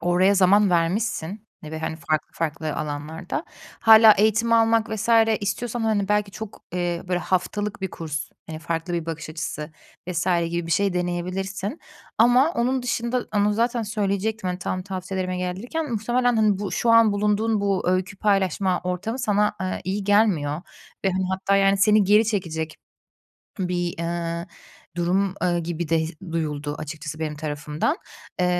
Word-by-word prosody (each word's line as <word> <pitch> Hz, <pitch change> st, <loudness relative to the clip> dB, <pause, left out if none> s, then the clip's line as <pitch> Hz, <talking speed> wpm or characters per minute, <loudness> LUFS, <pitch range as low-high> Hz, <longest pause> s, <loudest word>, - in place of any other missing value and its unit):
oraya 180 Hz, +3 st, +3 dB
zaman 200 Hz, +1 st, +5 dB
vermişsin, 190 Hz, +3 st, -1 dB, 0.2 s
e, 150 Hz, -, -8 dB
ve, 160 Hz, -, -5 dB
hani, 160 Hz, 0 st, -3 dB
farklı 155 Hz, -1 st, -1 dB
farklı 155 Hz, -1 st, -3 dB
alanlarda. 155 Hz, -, -4 dB, 0.4 s
Hâlâ 220 Hz, -1 st, +9 dB
eğitim 220 Hz, +3 st, +2 dB
almak 225 Hz, 0 st, +3 dB
vs. 220 Hz, +1 st, -3 dB, 0.3 s
istiyorsan, 235 Hz, +3 st, -2 dB
hani, 215 Hz, -3 st, +1 dB
belki 210 Hz, -1 st, +1 dB
çok, 210 Hz, +3 st, -9 dB
eee, 175 Hz, -1 st, -1 dB
böyle, 180 Hz, -1 st, +1 dB
haftalık 205 Hz, +3 st, -1 dB
bir 190 Hz, -, -3 dB
kurs, 155 Hz, -2 st, -5 dB, 0.2 s
eee, 160 Hz, -, -6 dB
farklı 165 Hz, +2 st, -3 dB
bir 170 Hz, -1 st, -2 dB
bakış 160 Hz, -1 st, -5 dB
açısı 155 Hz, -1 st, -5 dB, 0.4 s
vs. 175 Hz, -1 st, -1 dB, 0.2 s
gibi 170 Hz, 0 st, -2 dB
bir 165 Hz, -, -1 dB
şey 200 Hz, -2 st, +2 dB
deneyebilirsin 185 Hz, -, -3 dB, 0.4 s
ama 250 Hz, +7 st, +5 dB
onun 255 Hz, 0 st, 0 dB
dışında 245 Hz, 0 st, -1 dB
Onu 205 Hz, +1 st, +3 dB
zaten 235 Hz, +2 st, 0 dB
söyleyecektim. 205 Hz, -1 st, -1 dB
Hani, 180 Hz, -, -3 dB
tam 185 Hz, 0 st, -3 dB
tavsiyelerime 185 Hz, -1 st, -4 dB
gelirken 220 Hz, -, -3 dB
muhtemelen, 240 Hz, +2 st, +1 dB
hani, 210 Hz, -3 st, +3 dB
bu 200 Hz, -2 st, -4 dB
şu 235 Hz, -, +1 dB
an 230 Hz, -2 st, +6 dB
bulunduğun 210 Hz, +1 st, +1 dB
bu 200 Hz, -2 st, 0 dB
öykü 185 Hz, +2 st, 0 dB
paylaşma 190 Hz, -2 st, +1 dB
ortamı 180 Hz, +7 st, -3 dB
sana, 210 Hz, -3 st, +1 dB
eee, 185 Hz, 0 st, -2 dB
iyi 195 Hz, +2 st, -2 dB
gelmiyor 180 Hz, -7 st, +2 dB, 0.4 s
ve, 195 Hz, -, +3 dB
hani, 185 Hz, 0 st, -1 dB
hatta, 190 Hz, +1 st, +1 dB
yani, 195 Hz, 0 st, +4 dB
seni 210 Hz, +1 st, +5 dB
geri 210 Hz, +3 st, +5 dB
çekecek 160 Hz, -7 st, -2 dB, 0.8 s
bir, 180 Hz, -2 st, -1 dB
eee, 170 Hz, 0 st, -3 dB, 0.5 s
durum, 185 Hz, +3 st, +1 dB
eee, 175 Hz, -1 st, +1 dB
gibi 170 Hz, 0 st, -4 dB
de 165 Hz, +1 st, +3 dB
his 160 Hz, +2 st, -3 dB, 0.2 s
duyuldu 150 Hz, -3 st, -2 dB
açıkçası 155 Hz, 0 st, -6 dB
benim 155 Hz, -2 st, -3 dB
tarafımdan. 150 Hz, -, -2 dB, 0.4 s
Eee, 180 Hz, -, +3 dB
190 Hz, 155 wpm, -24 LUFS, 170-210 Hz, 0.8 s, Hâlâ